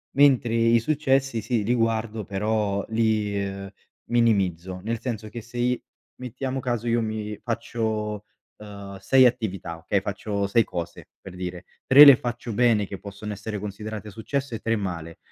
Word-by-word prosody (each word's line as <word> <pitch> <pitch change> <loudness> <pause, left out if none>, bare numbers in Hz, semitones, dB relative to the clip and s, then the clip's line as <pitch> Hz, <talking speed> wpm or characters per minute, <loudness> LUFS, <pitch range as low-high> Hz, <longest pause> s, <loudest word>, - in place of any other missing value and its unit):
mentre 135 -5 +4
i 115 0 +4
successi 135 -3 +1
sì, 115 0 -1
li 120 +4 +1
guardo 115 -2 -1
però 100 0 -1
li, 110 -3 +1
uhm, 100 0 -6 0.4
minimizzo, 95 -6 +1
nel 115 +1 -2
senso 110 -4 -5
che 120 +1 -7
se 120 +2 -11
i 125 +1 +1 0.4
mettiamo 130 +2 -4
caso 120 -2 -2
io 115 0 +2
mi 110 -1 -3
faccio, 110 -3 -3 0.3
uhm, 100 -2 -9
6 130 -1 +5
attività, 100 -9 -1
okay, 100 +4 0
faccio 100 0 -3
6 110 +3 +3
cose 85 -3 -6
per 95 - -11
dire, 90 0 -6 0.2
3 140 +3 +10
le 140 -3 +11
faccio 120 -1 -4
bene 115 -2 +3
che 100 0 -8
possono 105 +1 -7
essere 105 +1 -5
considerate 105 +1 -6
successe, 120 +2 -3
3 115 +1 0
male. 85 -5 -5
110 Hz, 155 wpm, -25 LUFS, 100-120 Hz, 0.4 s, le